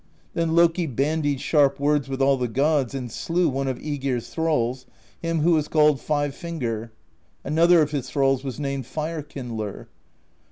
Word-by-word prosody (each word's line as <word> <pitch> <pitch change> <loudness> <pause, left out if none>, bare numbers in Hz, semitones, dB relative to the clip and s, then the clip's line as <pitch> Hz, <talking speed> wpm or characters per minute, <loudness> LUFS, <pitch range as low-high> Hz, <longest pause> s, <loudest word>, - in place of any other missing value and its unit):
Then 165 -1 0
Loki 170 0 +3
bandied 145 +1 0
sharp 145 -3 +3
words 145 -1 +1
with 135 0 -1
all 135 0 +4
the 125 -2 -1
gods, 140 +2 +1
and 125 -3 -5
slew 175 +1 0
one 135 -1 -1
of 130 -2 -2
iEgir's 135 -5 -3
thralls, 130 -6 -1 0.3
him 165 -1 -1
who 170 +3 +3
was 155 -2 +2
called 150 -3 +3
Five 145 -2 -1
Finger; 120 - -4 0.5
another 170 +1 +4
of 150 - -3
his 135 -4 -3
thralls 135 -2 +1
was 135 0 -5
named 140 -3 -3
Fire 155 +2 -3
Kindler. 120 -8 -6
145 Hz, 165 wpm, -24 LUFS, 130-160 Hz, 0.5 s, all